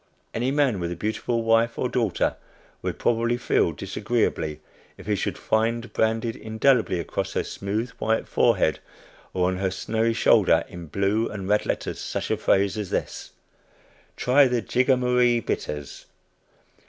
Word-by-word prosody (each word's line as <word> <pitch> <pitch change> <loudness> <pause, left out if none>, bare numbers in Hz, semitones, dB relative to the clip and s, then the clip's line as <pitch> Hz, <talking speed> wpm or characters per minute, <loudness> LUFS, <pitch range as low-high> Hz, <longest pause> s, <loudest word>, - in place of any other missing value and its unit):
Any 120 +3 0
man 135 -7 +2
with 85 -1 -3
a - - -3
beautiful 110 +5 -2
wife 115 +1 +2
or 125 - 0
daughter 115 -7 0 0.5
would - - -3
probably 115 +1 +1
feel 125 - +1
disagreeably, 80 -10 -2 0.4
if 95 - -12
he 105 - 0
should 100 - -2
find 115 +1 0
branded 115 +1 0
indelibly 110 -3 +1
across 85 - -3
her - - 0
smooth 110 +5 -3
white 110 0 0
forehead, - - +2 0.5
or 90 -1 +1
on 95 0 -1
her 95 0 0
snowy 110 +4 -1
shoulder - - +4
in 85 -1 -9
blue 100 +7 0
and 100 -3 -6
red 105 +1 +1
letters - - -3
such - - -3
a - - +1
phrase 100 +2 +2
as 100 -3 -4
this: - - -4 0.8
"Try 135 +2 +5
the 125 -3 0
Jigamaree 125 -1 +2
Bitters!" 75 -9 -5
110 Hz, 150 wpm, -25 LUFS, 100-120 Hz, 0.8 s, Try